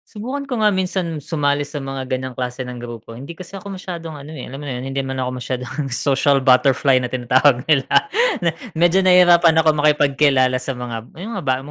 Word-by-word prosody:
Subukan 260 Hz, +7 st, -4 dB
ko 250 Hz, -5 st, -3 dB
nga 210 Hz, -, +5 dB
minsan 185 Hz, -4 st, -2 dB
sumali 145 Hz, -1 st, -1 dB
sa 145 Hz, 0 st, -6 dB
mga 135 Hz, -1 st, -5 dB
ganyang 130 Hz, -1 st, -4 dB
klase 125 Hz, 0 st, -4 dB
ng 125 Hz, -1 st, -6 dB
grupo. 115 Hz, -1 st, -9 dB
Hindi 140 Hz, +7 st, -8 dB
kasi 185 Hz, +3 st, -10 dB
ako 200 Hz, 0 st, -8 dB
masyadong 170 Hz, -4 st, -7 dB
ano 145 Hz, 0 st, -10 dB
eh, 125 Hz, -, -7 dB
alam 135 Hz, +3 st, -9 dB
mo 145 Hz, -, -6 dB
na 125 Hz, -, -4 dB
'yon 125 Hz, -, -6 dB
hindi 135 Hz, -, -1 dB
man 135 Hz, 0 st, -5 dB
ako 130 Hz, -1 st, -2 dB
masyadong 130 Hz, +3 st, -4 dB
"social 140 Hz, +2 st, +2 dB
butterfly" 130 Hz, 0 st, +3 dB
na 125 Hz, -, -3 dB
tinatawag 125 Hz, +1 st, +2 dB
nila. 145 Hz, -4 st, +2 dB, 0.6 s
Me 170 Hz, -, +2 dB, 0.2 s
medyo 175 Hz, +3 st, +4 dB
nahirapan 175 Hz, -3 st, +5 dB
ako 160 Hz, -1 st, +4 dB
makipagkilala 140 Hz, -3 st, +2 dB
sa 130 Hz, 0 st, -5 dB
mga 120 Hz, -2 st, -6 dB
yung 205 Hz, +7 st, -6 dB
mga -, -, -4 dB
ba 130 Hz, -, +2 dB
140 Hz, 205 wpm, -20 LUFS, 130-170 Hz, 0.6 s, nga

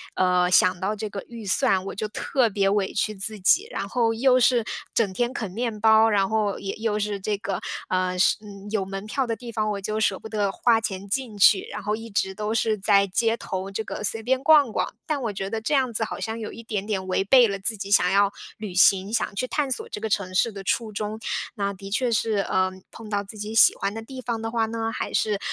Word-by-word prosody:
呃， 180 Hz, -1 st, +2 dB
想 185 Hz, 0 st, +4 dB
到 200 Hz, +3 st, -1 dB
这 215 Hz, +1 st, -4 dB
个 200 Hz, -1 st, -6 dB
预 230 Hz, -3 st, -9 dB
算， 190 Hz, -1 st, +1 dB
我 -, -, -6 dB
就 215 Hz, +2 st, -3 dB
特 240 Hz, +2 st, 0 dB
别 195 Hz, -1 st, +1 dB
委 200 Hz, -1 st, 0 dB
屈 215 Hz, 0 st, 0 dB
自 205 Hz, +2 st, -2 dB
己， 375 Hz, -, +3 dB
然 -, -, -3 dB
后 230 Hz, -2 st, +1 dB
又 255 Hz, +2 st, +4 dB
是， 245 Hz, -2 st, +3 dB, 0.3 s
整 205 Hz, -5 st, +1 dB
天 240 Hz, +4 st, 0 dB
啃 225 Hz, -7 st, -4 dB
面 225 Hz, +1 st, -3 dB
包， 220 Hz, +1 st, +5 dB
然 200 Hz, -3 st, +2 dB
后 215 Hz, -2 st, 0 dB
也 195 Hz, -, -4 dB
又 220 Hz, -1 st, -1 dB
是 205 Hz, -1 st, -2 dB
这 205 Hz, +1 st, -1 dB
个， 195 Hz, -2 st, -3 dB, 0.3 s
呃， 185 Hz, 0 st, 0 dB
是 -, -, +4 dB, 0.3 s
有 215 Hz, -3 st, 0 dB
门 195 Hz, +1 st, -6 dB
票 265 Hz, +5 st, -1 dB
的 230 Hz, -, -1 dB
地 240 Hz, 0 st, -9 dB
方， 215 Hz, -2 st, -1 dB
我 200 Hz, -, -3 dB
就 215 Hz, +2 st, -2 dB
舍 200 Hz, -3 st, +1 dB
不 -, -, -9 dB
得 210 Hz, -3 st, -1 dB
花 225 Hz, +2 st, +2 dB
钱 195 Hz, -2 st, -4 dB
进 225 Hz, 0 st, -3 dB
去。 195 Hz, 0 st, +6 dB
然 210 Hz, -, -5 dB
后 210 Hz, +2 st, 0 dB
一 225 Hz, +1 st, -9 dB
直 190 Hz, -2 st, -1 dB
都 210 Hz, +1 st, -2 dB
是 225 Hz, -1 st, +1 dB
在 200 Hz, 0 st, +3 dB
街 225 Hz, +4 st, +1 dB
头 190 Hz, +1 st, -5 dB
这 220 Hz, +3 st, -3 dB
个 210 Hz, -, -6 dB
随 220 Hz, +3 st, -1 dB
便 260 Hz, +3 st, 0 dB
逛 295 Hz, -6 st, +6 dB
逛， -, -, -1 dB
但 300 Hz, -3 st, -2 dB
我 230 Hz, -4 st, -2 dB
觉 195 Hz, 0 st, -4 dB
得 225 Hz, +1 st, -3 dB
这 225 Hz, -, -2 dB
样 260 Hz, -4 st, +2 dB
子 220 Hz, -, 0 dB
好 215 Hz, -, -5 dB
像 220 Hz, +4 st, -3 dB
有 215 Hz, -, -5 dB
一 230 Hz, -, -10 dB
点 210 Hz, -3 st, -3 dB
点 195 Hz, -3 st, -3 dB
违 185 Hz, +1 st, +1 dB
背 245 Hz, +4 st, +6 dB
了 200 Hz, -1 st, -3 dB
自 220 Hz, +1 st, +2 dB
己 200 Hz, 0 st, -6 dB
想 180 Hz, -3 st, +4 dB
要 200 Hz, 0 st, +3 dB, 0.3 s
旅 210 Hz, -4 st, -6 dB
行， 190 Hz, +2 st, +4 dB
想 230 Hz, -, -1 dB
去 255 Hz, -, -1 dB
探 285 Hz, 0 st, -1 dB
索 -, -, -3 dB
这 210 Hz, -, -6 dB
个 220 Hz, -, -2 dB
城 195 Hz, -3 st, -1 dB
市 230 Hz, +5 st, +3 dB
的 195 Hz, -2 st, -8 dB
初 220 Hz, +3 st, -1 dB
衷。 210 Hz, +1 st, -4 dB, 0.4 s
那 200 Hz, -2 st, -2 dB
的 195 Hz, 0 st, -10 dB
确 245 Hz, +3 st, +1 dB
是， 220 Hz, -2 st, +1 dB
呃， 185 Hz, -1 st, +1 dB, 0.2 s
碰 225 Hz, -, -11 dB
到 205 Hz, -1 st, -1 dB
自 205 Hz, +2 st, -11 dB
己 210 Hz, +1 st, -5 dB
喜 225 Hz, -, +6 dB
欢 195 Hz, +1 st, -2 dB
的 225 Hz, -, -6 dB
地 260 Hz, +4 st, -9 dB
方 235 Hz, -2 st, -3 dB
的 225 Hz, -, -3 dB
话 225 Hz, -1 st, +1 dB
呢， 225 Hz, 0 st, -3 dB
还 -, -, -4 dB
是， 210 Hz, -2 st, +1 dB
215 Hz, 270 characters per minute, -24 LUFS, 195-225 Hz, 0.4 s, 去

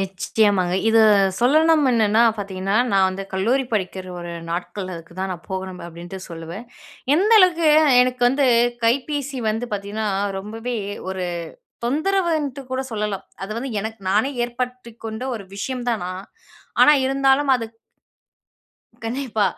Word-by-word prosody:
நிச்சயமாங்க, 195 Hz, -1 st, +1 dB
இது 225 Hz, 0 st, +5 dB, 0.4 s
சொல்லணும். 310 Hz, +4 st, +4 dB
என்னனா 220 Hz, -1 st, +3 dB, 0.2 s
பாத்தீங்கன்னா, 195 Hz, 0 st, -2 dB, 0.2 s
நான் 190 Hz, -1 st, +4 dB
வந்து 190 Hz, +1 st, -4 dB
கல்லூரி 235 Hz, +8 st, +1 dB
படிக்கிற 190 Hz, -2 st, -2 dB
ஒரு 175 Hz, 0 st, -6 dB, 0.2 s
நாட்கள், 180 Hz, +2 st, -4 dB
அதுக்கு 165 Hz, +1 st, -11 dB
தான் 190 Hz, 0 st, -2 dB
நான் 175 Hz, -1 st, -10 dB
போகணும் 190 Hz, -1 st, -5 dB
அப்பிடின்ட்டு 175 Hz, +3 st, -9 dB
சொல்லுவேன். 170 Hz, +8 st, -8 dB, 0.5 s
எந்த 395 Hz, +8 st, +2 dB
அளவுக்கு 340 Hz, -4 st, +4 dB, 0.4 s
எனக்கு 250 Hz, -1 st, -2 dB
வந்து 270 Hz, +2 st, +2 dB, 0.4 s
கைப்பேசி 275 Hz, +2 st, 0 dB
வந்து 225 Hz, +3 st, -3 dB
பாத்தீங்கன்னா, 205 Hz, +2 st, -3 dB, 0.3 s
ரொம்பவே 225 Hz, +4 st, -5 dB, 0.3 s
ஒரு 190 Hz, -1 st, -3 dB, 0.6 s
தொந்தரவுன்ட்டு 310 Hz, -2 st, 0 dB
கூட 260 Hz, 0 st, -1 dB
சொல்லலாம். 210 Hz, -2 st, -3 dB, 0.2 s
அது 205 Hz, -, -6 dB
வந்து 265 Hz, +3 st, -4 dB
எனக்கு 220 Hz, 0 st, -6 dB
நானே 220 Hz, +8 st, +2 dB
ஏற்படுத்திக் 245 Hz, -1 st, -5 dB
கொண்ட 220 Hz, +3 st, -5 dB
ஒரு 205 Hz, -, -7 dB
விஷயம் 245 Hz, +4 st, -4 dB
தான் 225 Hz, -5 st, -1 dB
நான் 185 Hz, +2 st, -6 dB, 0.6 s
ஆனா 300 Hz, -, +8 dB
இருந்தாலும் 270 Hz, +1 st, +2 dB
அது 230 Hz, -2 st, -3 dB, 1.4 s
கண்டிப்பா, 230 Hz, -3 st, -1 dB
225 Hz, 130 wpm, -22 LUFS, 190-265 Hz, 1.4 s, ஆனா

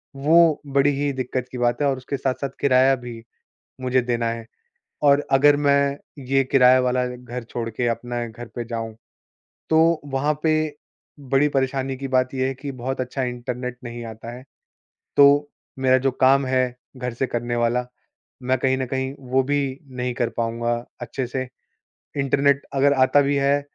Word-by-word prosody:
वो 155 Hz, +3 st, +4 dB
बड़ी 140 Hz, +1 st, +3 dB
ही 145 Hz, 0 st, 0 dB
दिक्कत 130 Hz, -1 st, -3 dB
की 125 Hz, -, -6 dB
बात 120 Hz, +2 st, 0 dB
है 145 Hz, -, +3 dB
और 135 Hz, -, -1 dB
उसके 130 Hz, +2 st, -4 dB
साथ-साथ 130 Hz, +1 st, -2 dB
किराया 130 Hz, 0 st, +5 dB
भी 120 Hz, -3 st, -9 dB, 0.6 s
मुझे 130 Hz, 0 st, +2 dB
देना 120 Hz, -1 st, -1 dB
है, 115 Hz, 0 st, -5 dB, 0.6 s
और 145 Hz, 0 st, +4 dB
अगर 145 Hz, +2 st, +6 dB
मैं 140 Hz, -1 st, +2 dB, 0.3 s
ये 135 Hz, 0 st, +4 dB
किराया 130 Hz, -1 st, +6 dB
वाला 125 Hz, 0 st, +1 dB
घर 125 Hz, 0 st, -7 dB
छोड़ 115 Hz, -1 st, -3 dB
के 120 Hz, +2 st, -2 dB
अपने 120 Hz, 0 st, -3 dB
घर 120 Hz, +2 st, -9 dB
पे 120 Hz, -, -3 dB
जाऊँ, 115 Hz, -1 st, -5 dB, 0.8 s
तो 160 Hz, +1 st, +4 dB
वहाँ 145 Hz, +2 st, 0 dB
पे 155 Hz, -1 st, +1 dB, 0.4 s
बड़ी 135 Hz, +1 st, +2 dB
परेशानी 135 Hz, -1 st, -1 dB
की 135 Hz, +1 st, -5 dB
बात 130 Hz, 0 st, +1 dB
ये 130 Hz, 0 st, +1 dB
है 135 Hz, -, -2 dB
कि 140 Hz, +2 st, -6 dB
बहुत 130 Hz, +1 st, -4 dB
अच्छा 130 Hz, +1 st, -3 dB
इंटरनेट 125 Hz, 0 st, -4 dB
नहीं 120 Hz, -1 st, -7 dB
आता 110 Hz, +1 st, -8 dB
है, 125 Hz, -, -11 dB, 0.7 s
तो 145 Hz, +1 st, +6 dB, 0.3 s
मेरा 130 Hz, 0 st, +4 dB
जो -, -, +2 dB
काम 135 Hz, +2 st, +3 dB
है 130 Hz, -1 st, 0 dB, 0.2 s
घर 125 Hz, -1 st, -4 dB
से 125 Hz, +3 st, -1 dB
करने 120 Hz, 0 st, -2 dB
वाला 120 Hz, +1 st, +1 dB, 0.6 s
मैं 130 Hz, +1 st, +1 dB
कहीं 130 Hz, +1 st, +1 dB
न 130 Hz, -, -1 dB
कहीं 130 Hz, +1 st, -2 dB, 0.2 s
वो 135 Hz, -, +4 dB
भी 140 Hz, -1 st, -1 dB
नहीं 125 Hz, -1 st, -3 dB
कर 120 Hz, -, 0 dB
पाऊँगा 115 Hz, +1 st, -1 dB, 0.3 s
अच्छे 120 Hz, +2 st, -4 dB
से, 130 Hz, +1 st, -3 dB, 0.7 s
इंटरनेट 140 Hz, +1 st, +2 dB
अगर 140 Hz, +1 st, +4 dB
आता 130 Hz, +2 st, +4 dB
भी 140 Hz, 0 st, +1 dB
है 140 Hz, +1 st, +2 dB
130 Hz, 175 wpm, -23 LUFS, 125-140 Hz, 0.8 s, अगर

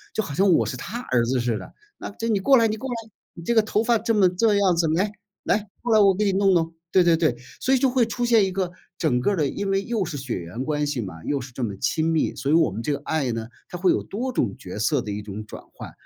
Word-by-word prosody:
就 220 Hz, -, +1 dB
好 145 Hz, -, -6 dB
像 190 Hz, +6 st, +3 dB
我 165 Hz, -, +4 dB
是 -, -, -4 dB
她 190 Hz, -, -6 dB
儿 125 Hz, -, +1 dB
子 125 Hz, +1 st, 0 dB
似 120 Hz, -2 st, 0 dB
的。 -, -, -11 dB, 0.3 s
那 -, -, -6 dB
这 225 Hz, +2 st, -5 dB
你 215 Hz, -4 st, +2 dB
过 270 Hz, +7 st, +5 dB
来 230 Hz, -, +4 dB
你 215 Hz, -, -1 dB
过 260 Hz, +5 st, -6 dB
来， 245 Hz, -, -2 dB, 0.4 s
你 170 Hz, -, -10 dB
这 235 Hz, -, 0 dB
个 225 Hz, -, +5 dB
头 215 Hz, 0 st, 0 dB
发 230 Hz, -1 st, +2 dB
这 230 Hz, +1 st, 0 dB
么 200 Hz, -3 st, +5 dB
这 205 Hz, +4 st, +2 dB
样 195 Hz, -3 st, +3 dB
子， 165 Hz, -1 st, +2 dB
来， 200 Hz, +4 st, +1 dB, 0.3 s
来， 210 Hz, -1 st, 0 dB
过 240 Hz, -1 st, +1 dB
来 215 Hz, -, +6 dB
我 195 Hz, -2 st, +5 dB
给 210 Hz, +3 st, 0 dB
你 200 Hz, -, +3 dB
弄 195 Hz, 0 st, +3 dB
弄。 165 Hz, -1 st, 0 dB, 0.2 s
对 185 Hz, -, +5 dB
对 170 Hz, -1 st, +4 dB
对， 155 Hz, -7 st, +1 dB, 0.2 s
所 265 Hz, +1 st, +2 dB
以 -, -, +3 dB
就 260 Hz, +1 st, +2 dB
会 250 Hz, -1 st, +2 dB
出 235 Hz, +2 st, -3 dB
现 230 Hz, -4 st, +4 dB
一 190 Hz, -, -3 dB
个 185 Hz, -2 st, -1 dB, 0.3 s
整 130 Hz, -8 st, +1 dB
个 200 Hz, +11 st, +1 dB
的 155 Hz, -5 st, +1 dB
因 200 Hz, +6 st, -3 dB
为 195 Hz, 0 st, +1 dB
又 220 Hz, -3 st, -1 dB
是 160 Hz, -3 st, -6 dB
血 130 Hz, -3 st, -4 dB
缘 90 Hz, +8 st, -6 dB
关 150 Hz, 0 st, -1 dB
系 145 Hz, -4 st, -2 dB
嘛， 90 Hz, -6 st, -8 dB
又 140 Hz, -2 st, -1 dB
是 130 Hz, +1 st, -9 dB
这 125 Hz, -, -7 dB
么 105 Hz, -5 st, -2 dB
亲 155 Hz, +10 st, 0 dB
密， 160 Hz, -2 st, +1 dB
所 140 Hz, 0 st, -3 dB
以 155 Hz, -, +4 dB
我 165 Hz, -10 st, +3 dB
们 110 Hz, +4 st, -5 dB
这 150 Hz, -, -1 dB
个 140 Hz, -, -4 dB
爱 145 Hz, -7 st, -1 dB
呢， 115 Hz, 0 st, -5 dB, 0.2 s
它 180 Hz, -, -7 dB
会 180 Hz, +1 st, +3 dB
有 -, -, +1 dB
多 250 Hz, +6 st, -4 dB
种 105 Hz, -, -1 dB
角 90 Hz, +3 st, -8 dB
色 130 Hz, +6 st, +1 dB
的 105 Hz, -, -5 dB
一 105 Hz, +1 st, -4 dB
种 105 Hz, +1 st, -7 dB
转 -, -, -10 dB
换。 -, -, -9 dB
175 Hz, 320 characters per minute, -24 LUFS, 130-210 Hz, 0.4 s, 来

